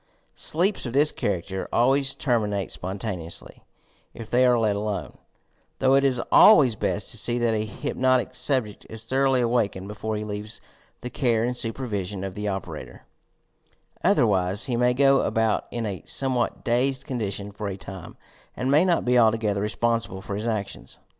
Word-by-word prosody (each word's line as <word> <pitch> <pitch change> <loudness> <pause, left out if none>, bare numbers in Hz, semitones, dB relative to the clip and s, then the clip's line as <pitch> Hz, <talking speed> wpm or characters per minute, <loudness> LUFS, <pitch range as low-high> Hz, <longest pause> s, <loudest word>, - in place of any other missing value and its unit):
Sleeps 180 -1 0
of 120 - -6
this 145 +3 +4
character 95 0 -3
always 135 +3 +2
terminate 105 -7 -1
spontaneously 95 -3 -6 0.5
if 115 -1 -9
they 125 +1 +4
are 125 -1 +4
let 110 -3 +1
alone, 105 0 -4 0.3
— - - -42
though 135 0 +3
it 135 0 +4
is 130 -3 +2
always 140 - +7
best - - -2
to - - -5
see 120 0 +1
that 120 -2 +1
a 110 0 -1
hypnotic 130 +5 0
subject 125 -8 -1
is 110 0 -7
thoroughly 130 +2 +2
awakened 110 -5 0
before 110 +1 -4
he 105 - -3
leaves 105 +1 -5 0.4
the 125 - -6
care 115 -4 +1
and 125 +1 -1
supervision 105 -6 -3
of 95 -1 -4
the 105 +2 -4
operator, 95 -5 -6 1.0
otherwise 95 0 +2
he 125 -3 -1
may 125 +1 +2
go 135 0 +4
about 110 -1 0
in 120 -1 -4
a 95 -6 -4
somewhat 130 -3 -1
dazed 130 +3 0
condition 105 -5 -4
for 105 +1 -6
a 95 -1 -4
time, 95 -2 -10 0.4
and 130 +2 -1
may 150 +4 +5
not 175 -3 +1
be 125 0 +4
altogether 110 -3 +2
responsible 105 -1 -1
for 100 - -6
his 105 +3 -3
ac 105 -3 -1
tions. - - -12
115 Hz, 170 wpm, -25 LUFS, 100-125 Hz, 1.0 s, always